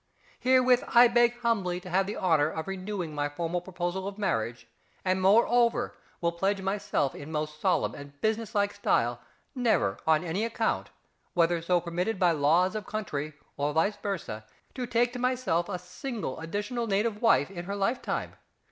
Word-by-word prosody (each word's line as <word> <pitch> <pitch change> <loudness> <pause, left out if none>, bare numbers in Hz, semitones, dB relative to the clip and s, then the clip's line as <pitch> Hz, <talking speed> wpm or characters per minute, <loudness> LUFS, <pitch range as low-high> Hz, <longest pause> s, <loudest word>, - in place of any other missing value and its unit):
Herewith 255 -1 +4
I 240 +1 +9
beg 240 0 +3
humbly 195 -7 0
to 180 - -9
have 190 +2 +2
the 210 - -4
honour 160 -5 +3
of 160 +2 -5
renewing 190 -3 -4
my 145 0 -1
formal 170 +3 -2
proposal 180 +1 -3
of 200 0 -6
marriage, 120 - -2 0.4
and 185 0 +1
moreover 235 +4 +3 0.3
will 170 -1 +2
pledge 195 +4 0
myself 195 -7 -1
in 145 +2 -9
most 150 0 -3
solemn - - +2
and 145 0 -11
business 220 0 -1
like 205 0 +2
style 120 -11 +1 0.3
never 225 - +1
on 160 0 +4
any 180 +5 -1
account, 230 - -1 0.5
whether 170 -1 +3
so 175 +1 +2
permitted 175 +5 -2
by 180 -2 +4
laws 165 +5 +3
of 215 -2 -4
country 155 -8 -3 0.2
or 145 +1 0
vice 180 +7 +1
versâ, 175 - -4 0.3
to 250 -2 -4
take 240 +1 +1
to 250 - -5
myself 250 -9 0
a 185 - -2
single 180 - -5
additional 205 +8 -3
native 210 +1 0
wife 225 -8 +4
in 175 -2 -6
her 200 +2 -3
lifetime. 205 +6 -1
190 Hz, 170 wpm, -28 LUFS, 165-220 Hz, 0.5 s, I